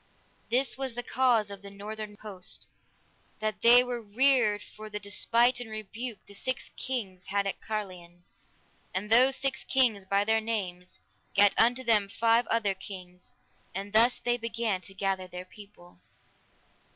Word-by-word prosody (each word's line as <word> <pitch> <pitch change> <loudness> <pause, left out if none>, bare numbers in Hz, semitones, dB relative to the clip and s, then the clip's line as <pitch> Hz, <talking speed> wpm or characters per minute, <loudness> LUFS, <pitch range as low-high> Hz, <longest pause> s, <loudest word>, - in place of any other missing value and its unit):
This 260 +2 +1
was 265 -3 -2
the 245 - -3
cause 240 -5 +2
of 200 -1 -8
the 200 - -9
northern 210 +1 -8
host: 195 -4 -7 0.7
that 215 -1 -3
they 240 +1 +8
were 245 -1 -4
reared 225 -1 +3
for 215 0 -11
the 210 0 -5
despite 230 +5 +2
and 245 -2 -7
rebuke 215 +1 -6
the 200 - -14
six 260 +5 -4
kings 200 -8 -4
had 200 0 0
at 195 - -4
Carlion. 180 -5 -6 0.7
And 205 +3 -3
those 255 +3 +6
six 270 -3 -1
kings 235 -7 +2
by 200 +1 +2
their 220 +1 +2
means, 185 -5 -4 0.3
gat 200 0 +6
unto 245 +3 +3
them 215 -4 +3
five 230 +3 +2
other 220 -3 +1
kings; 185 -2 -10 0.4
and 200 +2 -5
thus 235 +3 +5
they 240 0 0
began 230 -4 -2
to 195 +2 -12
gather 190 -1 -1
their 180 0 -8
people. 190 - -15
215 Hz, 155 wpm, -29 LUFS, 195-235 Hz, 0.7 s, they